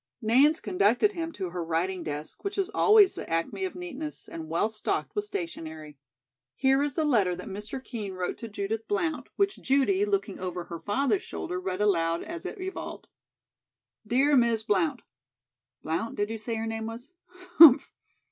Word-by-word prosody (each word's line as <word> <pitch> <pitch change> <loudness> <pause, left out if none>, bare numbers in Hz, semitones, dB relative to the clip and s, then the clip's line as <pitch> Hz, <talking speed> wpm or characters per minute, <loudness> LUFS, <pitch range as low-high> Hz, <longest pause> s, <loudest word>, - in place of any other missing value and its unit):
Nance 270 +7 +4
conducted 210 - +2
him 330 -4 -4
to 185 -7 -5
her 175 -1 -3
writing 170 +3 -1
desk, 150 0 -6
which 400 0 -4
was 395 +1 -1
always 420 -3 +6
the - - -7
acme 165 - -1
of 375 - -5
neatness, 315 -4 -7
and 160 -1 -8
well 170 +6 +1
stocked 220 -1 -3
with 415 0 -1
stationery. 160 - -6 0.6
Here 270 +1 +3
is 290 -2 -1
the 315 - +1
letter 205 -11 +2
that 180 - -8
Mr. 210 +6 -6
Kean 215 -7 -5
wrote 180 -1 -3
to 230 - -6
Judith 210 +1 -4
Blount, 345 -6 -1
which 395 0 0
Judy, 280 +9 +2
looking 395 - -1
over 180 -1 -4
her 170 -1 -8
father's 215 +1 0
shoulder, 180 - -5
read 185 +1 -3
aloud 170 -5 +2
as 340 0 -6
it 430 - -7
evolved: 380 +1 -6 1.0
"'Dear 275 +6 +3
Miss 235 -3 +3
Blount:' 190 -7 0 0.8
(Blount, 165 +9 -2
did 205 +1 -1
you 225 - -4
say 225 +2 -4
her 225 0 -3
name 225 0 -3
was? 235 +7 -8 0.5
Humph!) 310 -6 +9
225 Hz, 175 wpm, -28 LUFS, 185-310 Hz, 1.0 s, Humph